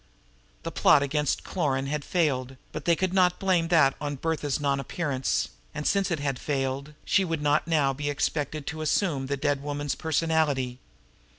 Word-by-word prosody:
The - - -4
plot 140 - +5
against 150 0 0
Cloran 140 -7 -1
had 145 +1 -2
failed, 135 -7 0 0.2
but - - -6
they 170 - +4
could 185 +1 -1
not 180 -2 +3
blame 185 -4 +2
that 160 -5 +5
on 145 -1 -2
"Bertha's" 150 -1 -1
non 140 -1 +1
appearance; 135 -2 -1 0.3
and 150 - -4
since 195 -1 +2
it 170 -4 -1
had 140 -3 -2
failed 140 +1 -2
she 195 - +3
would 165 -4 -2
not 150 +2 +2
now 150 -5 +2
be 145 +2 -3
expected 145 +1 -2
to 155 +1 -5
assume 150 -3 0
the 140 +1 -1
dead 145 0 0
woman's 145 -1 -2
personality. 155 -6 0
145 Hz, 175 wpm, -27 LUFS, 140-165 Hz, 0.3 s, plot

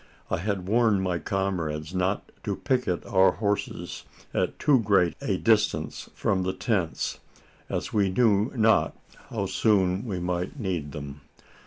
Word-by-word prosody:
I - - +2
had 95 0 -2
warned 110 -2 +3
my 90 -2 0
comrades 85 -6 -2
not 95 +2 -1
to - - -1
picket 125 -9 -1
our 95 -1 +4
horses 105 +1 -2 0.3
at - - 0
too 140 -4 +4
great 100 -6 +3
a - - 0
distance - - +1
from 95 - +1
the 95 0 -1
tents: 95 -7 -1 0.5
as - - -3
we 100 -2 +3
knew 105 +1 +3
not 110 -1 +3 0.3
how 105 -4 -2
soon 95 0 +2
we 95 -4 -2
might 90 +8 -3
need 90 - -2
them. 70 -1 -7
95 Hz, 145 wpm, -26 LUFS, 90-105 Hz, 0.5 s, our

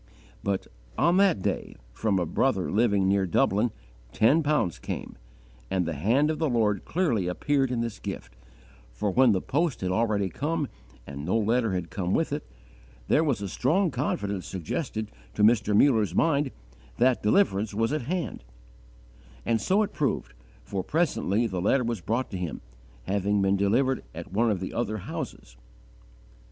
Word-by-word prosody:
But, 100 -1 -1 0.3
on 175 +2 +3
that 190 - +3
day, - - -2 0.2
from 105 - 0
a 90 - +1
brother 95 +1 0
living 100 -3 +2
near 95 -1 +2
Dublin, 105 +6 +2 0.4
ten 115 - +4
pounds 150 - 0
came: - - -6 0.5
and 90 -2 0
the 85 - -2
hand 120 - +2
of 155 - -4
the 160 -2 +1
Lord 105 -5 +1
clearly 140 - 0
appeared 135 +8 +1
in 120 -2 -1
this 115 -2 -4
gift, - - -7 0.6
for 95 +12 -2
when 125 +4 +5
the 95 -3 0
post 150 -1 0
had 90 -1 -1
already 105 -1 +1
come 150 - -2 0.4
and 70 0 -7
no 90 +8 +1
letter 115 0 +1
had 90 -3 -3
come 95 -1 -1
with - - 0
it, - - -4 0.6
there 155 - +4
was 130 -10 0
a - - -2
strong 160 - +1
confidence 100 -7 -2
suggested 110 - -4 0.2
to - - +1
Mr. 105 -2 +4
Muller's 110 -7 +3
mind 145 -3 +2 0.5
that 125 0 +3
deliverance 105 - +2
was 115 +5 +1
at 155 - 0
hand; 175 - -3 1.0
and 115 -2 +1
so 195 - +3
it 205 - -4
proved, 140 - -1 0.3
for 95 +10 -3
presently 120 - +1
the 95 -5 -2
letter 125 +7 +2
was 115 -4 -2
brought 115 +8 -1
to 95 - -3
him, 85 -3 -4 0.4
having 100 +5 0
been 95 0 +3
delivered 120 +7 +1
at - - -8
one 115 +3 +3
of 100 -4 0
the 95 - -4
other 110 -2 -1
houses. - - -7
110 Hz, 165 wpm, -27 LUFS, 95-135 Hz, 1.0 s, when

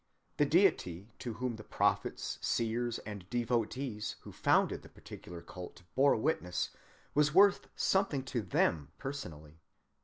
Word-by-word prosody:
The - - +4
deity 90 +5 +2
to 120 - -4
whom 120 +1 -3
the 105 - -9
prophets, - - 0
seers, 115 +1 0
and 100 -4 -7
devotees 120 -1 -1
who - - -10
founded - - +2
the - - -14
particular 85 -1 -10
cult 90 -1 -9
bore 140 +1 +5
witness 90 - 0 0.4
was 150 +1 +3
worth 200 0 +6
something 190 -9 +2
to 125 -3 -2
them 80 -6 +1
personally. 80 - -7
115 Hz, 130 wpm, -33 LUFS, 90-135 Hz, 0.4 s, worth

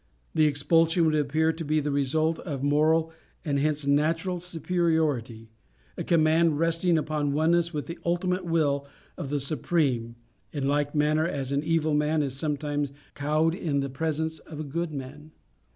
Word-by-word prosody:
The 155 -1 +4
expulsion 165 +4 +2
would 155 - +2
appear 155 +2 +1
to 165 +1 -6
be 155 0 +1
the 150 0 -2
result 155 +4 +1
of 140 -6 -5
moral, 155 +3 +2 0.3
and 140 -2 0
hence 150 0 0
natural, 165 +5 +1
superiority 160 -10 -1 0.4
a - - -4
command 160 -1 +3
resting 165 +1 +2
upon 150 -2 -1
oneness 170 +3 +2
with 150 -3 -4
the 170 - -7
ultimate 180 +2 0
will 145 -5 0 0.3
of 140 - -6
the 145 0 0
Supreme, 135 -4 0 0.4
in 140 -2 -2
like 145 +1 0
manner 155 +2 +2
as 140 -6 -3
an 140 +1 0
evil 160 -1 +1
man 150 +1 +2
is 135 -2 -3
sometimes 145 -1 -2 0.2
cowed 155 +3 +1
in 155 -6 -1
the 135 -1 -4
presence 160 +2 -2
of 155 -2 -10
a - - -3
good 165 +3 -3
man. 145 +2 -8
155 Hz, 165 wpm, -27 LUFS, 145-165 Hz, 0.4 s, The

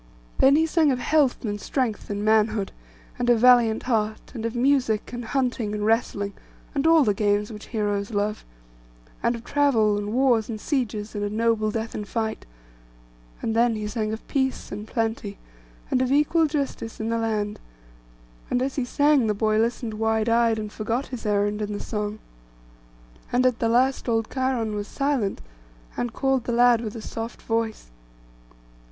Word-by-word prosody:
Then 270 +1 +6
he 320 +2 +4
sang 320 -2 +3
of 255 - 0
health, 275 -1 +1
and 205 -1 -3
strength, 245 -6 -2
and 205 0 -3
manhood, 215 -2 +2 0.5
and 245 0 0
a 240 - +6
valiant 235 -1 +5
heart; 215 -3 -1
and 230 -3 -3
of 230 - -6
music, 250 -4 +1
and 240 0 -4
hunting, 245 -4 -1
and 210 0 -2
wrestling, 205 -3 0 0.4
and 285 +1 +1
all 325 -2 +6
the 210 -5 +2
games 205 +1 0
which 210 - -10
heroes 205 -3 -1
love: 210 -1 -2 0.8
and 240 - +1
of 230 - -9
travel, 230 -8 +2
and 205 0 -4
wars, 245 -3 +2
and 220 -2 -4
sieges, 220 -6 -2
and 205 -1 -3
a 205 - -1
noble 220 0 +1
death 225 +1 -3
in 210 - -4
fight; 220 - -3 1.0
and 225 - -1
then 235 0 +3
he 215 -1 -4
sang 215 0 -2
of 220 - -6
peace 265 -2 -1
and 210 +2 -6
plenty, 225 -3 -2 0.5
and 255 - +2
of 260 0 0
equal 310 +3 +3
justice 280 -6 -3
in 220 0 -2
the 230 0 0
land; 215 -2 -2 0.9
and 245 - +1
as 270 +1 -3
he 260 - 0
sang 285 -1 +3
the 210 - +1
boy 215 +1 +1
listened 230 0 -1
wide 220 0 0
eyed, 230 -1 +3
and 215 -1 -5
forgot 230 +5 -2
his 245 -4 -5
errand 205 0 +1
in 210 0 -3
the 205 - -4
song. 210 -1 -3 1.1
And 250 +1 +2
at 250 -2 +2
the 230 - +1
last 255 +2 +2
old 225 -1 0
Cheiron 255 -5 0
was 205 0 -4
silent, 275 -7 -1 0.5
and 240 - -2
called 265 +1 0
the 240 - -1
lad 240 -1 +5
with 220 -2 -5
a 225 - -7
soft 225 +3 -6
voice. 225 - -2
225 Hz, 180 wpm, -24 LUFS, 215-250 Hz, 1.1 s, Then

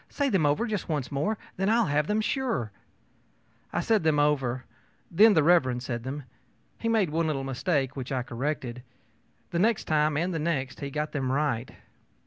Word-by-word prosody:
Say 285 -1 0
them 185 - +2
over 150 +11 +1
just 215 -6 -3
once 150 -5 -2
more, 145 +10 0
and 215 - -10 0.2
then 195 +2 +1
I'll 230 +1 +4
have 150 +1 +1
them, 210 +1 +1
sure.ö 215 - -1 1.0
I - - 0
said 220 -2 +2
them 160 -2 +2
over. 135 -4 +1 0.5
Then 205 +4 +6
Mr. 150 -6 +4
said 120 -1 -4
them. 135 +4 -5 0.6
He 230 - -1
made 215 -8 +2
one 165 +1 +1
little 140 -3 -1
mistake, 135 0 -1
which 130 -1 -6
I 130 -2 0
corrected. 125 0 -3 0.7
The 170 - 0
next 220 +3 +2
time 150 -1 +1
and 175 +4 0
the 165 - -1
next 135 -5 -2
he 140 - -4
got 150 +2 -3
them 130 -3 -1
right. 135 -4 0
150 Hz, 185 wpm, -27 LUFS, 135-185 Hz, 1.0 s, Then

